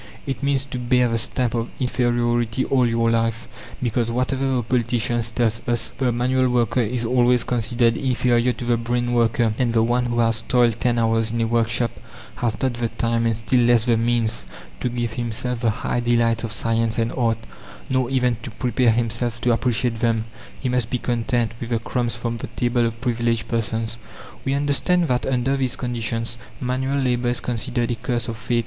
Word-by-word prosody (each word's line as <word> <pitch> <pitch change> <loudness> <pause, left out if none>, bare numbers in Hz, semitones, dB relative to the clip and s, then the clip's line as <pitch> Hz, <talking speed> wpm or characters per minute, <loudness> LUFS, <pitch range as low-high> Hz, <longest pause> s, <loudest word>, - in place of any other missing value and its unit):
It 135 -3 -3
means 140 -1 +1
to 125 -2 -5
bear 125 0 +3
the 115 0 0
stamp 120 +2 -1
of 115 -1 -2
inferiority 120 -1 +1
all 130 -3 +3
your 115 0 +2
life; 115 0 0 0.4
because, 115 -1 0
whatever 130 +3 0
the 130 -2 0
politicians 120 0 0
tell 120 +2 0
us, 115 +1 0
the 130 -2 +1
manual 130 +2 +1
worker 125 0 +2
is 120 +1 -1
always 125 0 +3
considered 120 0 +1
inferior 125 -1 +2
to 120 - -6
the 120 -1 +2
brain 120 +1 -1
worker, 115 -1 +2
and 120 -3 +1
the 115 -1 +3
one 120 +1 +1
who 120 0 -2
has 115 -1 +2
toiled 120 -1 +2
ten 120 -1 +2
hours 115 -1 +2
in 115 +1 -2
a - - +2
workshop 115 0 +1 0.5
has 115 -4 -1
not 130 0 0
the 120 -1 -2
time, 115 0 0
and 115 -1 +1
still 115 +3 +1
less 120 -1 +4
the 120 -2 +3
means, 115 -1 0 0.3
to 125 - -1
give 120 -1 -2
himself 120 +1 -3
the 115 -1 +2
high 120 +2 -1
delights 115 -1 +2
of 115 - -3
science 115 0 0
and 115 0 0
art, 115 -4 +1 0.5
nor 130 -2 0
even 125 -3 +1
to 120 - -6
prepare 120 +1 +1
himself 115 +1 0
to 120 - +2
appreciate 120 0 0
them; 115 -2 +1 0.3
he 130 - -2
must 125 -2 0
be 125 - 0
content 120 -1 0
with 120 - -5
the 120 - +1
crumbs 120 0 -2
from 115 0 -3
the - - -5
table 120 -1 0
of 115 0 -6
privileged 120 -2 0
persons. 115 0 -1 0.5
We 135 0 +1
understand 145 +5 +2
that 125 -1 0
under 130 +1 +1
these 130 -3 0
conditions 115 -1 -3 0.2
manual 130 +2 -1
labour 125 -2 +1
is 120 - +1
considered 120 0 -2
a - - 0
curse 120 0 -2
of 115 - -3
fate. 115 +2 0
120 Hz, 195 wpm, -22 LUFS, 115-125 Hz, 0.5 s, less